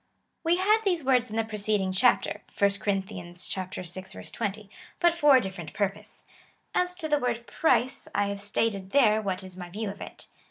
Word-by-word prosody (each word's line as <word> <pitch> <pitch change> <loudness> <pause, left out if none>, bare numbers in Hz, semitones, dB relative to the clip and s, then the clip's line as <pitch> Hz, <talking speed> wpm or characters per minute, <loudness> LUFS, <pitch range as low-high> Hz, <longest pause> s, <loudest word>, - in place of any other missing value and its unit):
We 340 +1 +3
had 420 +4 +4
these 355 -6 +1
words 250 -2 +3
in 215 - -6
the 225 - +2
preceding 210 -3 0
chapter, 245 +6 +2 0.2
(1 200 0 +4
Cor. 205 -1 +1
vi. 180 -2 -6 1.0
20,) 205 0 -3 0.3
but 345 -1 +4
for 295 -5 +6
a - - +7
different 190 -7 -6
purpose. 200 -1 -3 0.5
As 360 0 +1
to 330 -3 -4
the 295 -1 +2
word 235 -2 -2
price, 255 -5 +1
I 205 - +3
have 200 0 -4
stated 205 -1 -1
there, 220 -4 +4
what 190 -2 -2
is 185 -1 -8
my 180 -1 -7
view 205 +2 -4
of 200 - -13
it. - - -8
215 Hz, 185 wpm, -27 LUFS, 195-270 Hz, 1.0 s, a